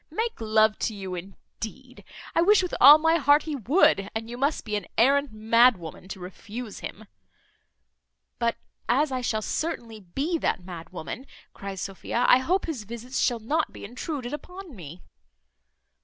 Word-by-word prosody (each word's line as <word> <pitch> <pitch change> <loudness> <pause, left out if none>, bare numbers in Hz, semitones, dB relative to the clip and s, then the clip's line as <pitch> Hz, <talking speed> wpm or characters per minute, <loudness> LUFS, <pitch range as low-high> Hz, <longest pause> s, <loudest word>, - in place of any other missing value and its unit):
Make 450 - -3
love 215 -1 +3
to 220 - -2
you 190 -2 -6
indeed! 220 +7 -9 0.3
I 330 - +3
wish 405 +2 +5
with 360 - -4
all 285 +4 +11
my 325 +1 +3
heart 290 -1 +4
he 310 -2 -3
would, 235 - +3
and 225 0 -3
you - - -5
must 280 +5 -1
be 210 -2 -2
an 205 -4 -3
arrant 280 +3 +4
mad 230 +2 +4
woman 170 +1 -10
to 195 0 -7
refuse 205 +5 -8
him." 220 - -8 1.3
"But 235 0 +1 0.3
as 275 +4 +3
I 255 -1 -1
shall 220 -3 -1
certainly 235 -9 -3
be 275 - -2
that 185 - -1
mad 170 -3 -8
woman," 185 +9 -7 0.3
cries 195 -1 -7
Sophia, 200 +5 -2
"I 250 - +7
hope 360 +9 0
his 295 -10 -4
visits 235 +4 -5
shall 240 - +2
not 300 +9 -1
be - - -9
intruded 250 +3 -5
upon 360 0 -8
me." 170 -1 -10
240 Hz, 170 wpm, -26 LUFS, 210-290 Hz, 1.3 s, all